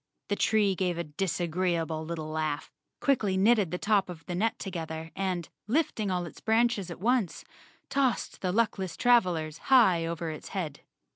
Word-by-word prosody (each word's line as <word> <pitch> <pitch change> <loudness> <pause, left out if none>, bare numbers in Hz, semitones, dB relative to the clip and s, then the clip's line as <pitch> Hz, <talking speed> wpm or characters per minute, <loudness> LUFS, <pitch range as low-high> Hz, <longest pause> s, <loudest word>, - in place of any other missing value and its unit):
The 205 - +1
tree 210 -2 +3
gave 180 -2 -1
a 170 - -1
disagreeable 165 0 -1
little 160 -1 -5
laugh, 155 -2 -2 0.3
quickly 215 -9 +2
knitted 205 -2 +4
the 180 - -2
top 205 -1 +2
of 170 -2 -9
the 180 - -4
net 220 +6 0
together 160 -3 -5
and, 185 -4 -2 0.2
lifting 230 -5 0
all 180 -1 -1
its 170 - -11
branches 225 -4 +2
at 170 - -7
once, 225 -5 0 0.4
tossed 270 -3 0
the 185 - 0
luckless 190 -4 0
travelers 175 -10 +2
high 190 -11 +5
over 165 -1 -3
its 155 - -8
head. 155 -6 -3
185 Hz, 160 wpm, -29 LUFS, 165-215 Hz, 0.4 s, high